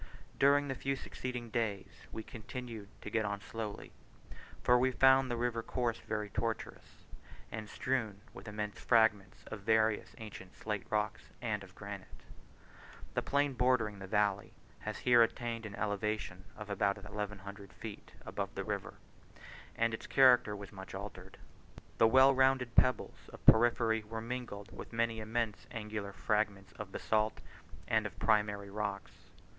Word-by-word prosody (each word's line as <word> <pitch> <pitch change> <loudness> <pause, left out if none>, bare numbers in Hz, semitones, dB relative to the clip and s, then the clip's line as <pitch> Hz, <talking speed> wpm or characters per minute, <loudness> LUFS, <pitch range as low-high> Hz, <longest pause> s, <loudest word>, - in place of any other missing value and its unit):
During 145 +1 +5
the 135 - -1
few 135 +1 -1
succeeding 125 -3 -5
days 100 -8 -3
we 110 - -5
continued 115 -2 -7 0.2
to - - -6
get 110 -1 +2
on 100 -1 -2
slowly, 105 0 -6 0.7
for 125 0 +6
we 130 +1 +4
found 130 +1 +5
the 120 - -1
river 120 -1 0
course 120 0 -1
very 105 -1 -3
tortuous, 115 -1 -4 0.5
and 110 -1 -5
strewed 110 -6 -1
with - - -10
immense 105 0 -4
fragments 110 -2 +3
of 110 - -4
various 110 +1 +2
ancient 105 -4 -9
slate 105 -2 -4
rocks, 105 -1 -1
and 105 -4 -2
of 95 -1 -14
granite. 100 -2 -9 0.9
The - - +1
plain 140 0 +1
bordering 120 -5 +2
the 95 - -7
valley 100 0 +1 0.3
has - - -4
here 120 -1 +5
attained 115 -1 0
an 100 - -8
elevation 105 -3 -2
of 105 -1 -7
about 100 0 +1
1100 100 -1 -6
feet - - -9
above - - -4
the - - -2
river, - - -3 0.8
and 115 0 +1
its 110 - -5
character 125 -6 +6
was 100 -1 -8
much 95 -1 -9
altered. 95 -1 -8 0.6
The 115 - +7
well 130 +3 +7
rounded 130 -2 +3
pebbles 125 +1 +2
of - - -13
porphyry 115 -1 +5
were 110 +1 -5
mingled 115 -4 -5
with - - -9
many 115 0 +1
immense 110 0 -2
angular 105 -2 -4
fragments 100 -2 0
of 100 -2 -6
basalt 110 +1 +1 0.5
and - - +2
of - - -12
primary 105 -2 +1
rocks. 100 -1 -3
110 Hz, 150 wpm, -34 LUFS, 100-120 Hz, 0.9 s, The